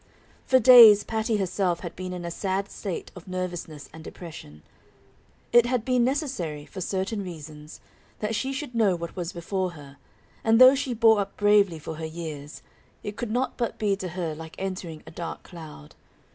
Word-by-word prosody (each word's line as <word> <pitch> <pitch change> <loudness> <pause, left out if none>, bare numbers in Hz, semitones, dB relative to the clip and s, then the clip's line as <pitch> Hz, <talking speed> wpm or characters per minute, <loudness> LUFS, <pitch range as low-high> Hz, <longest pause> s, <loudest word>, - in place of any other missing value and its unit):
For 260 - +5
days 230 -4 +9
Patty 220 0 -1
herself 185 -2 -1
had 175 - -7
been 185 0 -6
in 180 -1 -6
a 170 - -4
sad 195 +2 -2
state 195 -5 -5
of 180 -1 -12
nervousness 175 -5 -5
and 160 - -11
depression; 115 - -11 0.9
it 240 0 +6
had 245 -3 -1
been 250 -2 +2
necessary, 245 - -2
for 190 - -8
certain 195 +3 -2
reasons, 155 -3 -10 0.4
that 215 +1 -3
she 260 +5 -1
should 275 -2 -5
know 215 -5 +3
what 170 0 -7
was 175 -2 -4
before 185 +1 -3
her, 140 -3 -13 0.5
and 225 +1 +4
though 255 +1 +10
she 265 -3 -2
bore 225 -1 +5
up 200 0 -4
bravely 205 -4 +4
for 155 0 -7
her 160 - -5
years, 155 -2 -8 0.4
it 205 - -5
could 240 - -4
not 250 +4 -1
but 235 -2 -2
be 205 -2 +1
to 190 - -5
her 170 -2 -4
like 160 +1 -10
entering 185 -5 -5
a 160 - -11
dark 170 0 -6
cloud. 155 - -12
185 Hz, 185 wpm, -26 LUFS, 165-220 Hz, 0.9 s, though